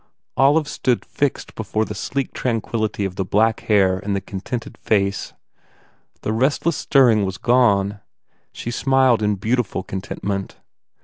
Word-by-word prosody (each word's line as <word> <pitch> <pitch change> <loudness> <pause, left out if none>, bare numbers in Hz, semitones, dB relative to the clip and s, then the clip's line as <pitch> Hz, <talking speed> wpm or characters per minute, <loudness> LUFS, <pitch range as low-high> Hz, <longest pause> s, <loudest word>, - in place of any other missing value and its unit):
Olive 145 +3 +4
stood 125 -4 -1
fixed 145 -2 -2
before 110 0 -2
the 105 - -6
sleek 130 +7 -3
tranquillity 110 -3 -1
of 95 -1 -5
the 95 - 0
black 110 +4 +2
hair 95 -3 +2
and 100 +1 -2
the - - 0
contented 100 +5 -6
face. 100 -2 0 0.9
The 110 - -2
restless 140 +7 +1
stirring 120 -7 +4
was 95 -1 -3
gone. 105 -5 +2 0.5
She 120 - -6
smiled 130 -2 +3
in 105 -1 +1
beautiful 110 -1 -1
con 95 0 -5
tentment. 100 0 -4
110 Hz, 140 wpm, -21 LUFS, 100-125 Hz, 0.9 s, Olive